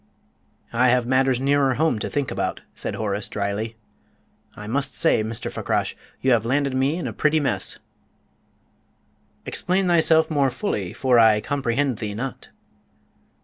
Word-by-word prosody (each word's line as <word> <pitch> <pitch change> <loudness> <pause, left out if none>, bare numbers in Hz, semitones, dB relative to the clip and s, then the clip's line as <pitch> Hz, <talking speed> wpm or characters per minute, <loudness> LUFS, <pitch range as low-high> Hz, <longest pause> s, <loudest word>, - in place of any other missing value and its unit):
"I 125 +2 +3
have 125 -1 +3
matters 130 0 +2
nearer 135 -1 +2
home 155 -6 +1
to - - -3
think 145 -4 -2
about," - - -2
said - - -4
Horace, 105 -1 -2
dryly. 105 +2 -3 0.8
"I 105 - -9
must 135 +6 -1
say, 110 - +3
Mr. 110 +1 -4
Fakrash, - - -2 0.3
you 130 - +2
have 115 -3 +3
landed 135 +3 0
me 135 +4 +1
in 175 - -4
a - - -4
pretty 155 +1 +2
mess!" 145 - -1 1.7
"Explain 185 +2 0
thyself 160 -2 +4
more 140 -3 +2
fully, 120 - -3
for 125 -3 +2
I 110 -2 +6
comprehend 135 0 -1
thee 105 -2 -4
not." 130 +4 -6
130 Hz, 145 wpm, -23 LUFS, 110-145 Hz, 1.7 s, I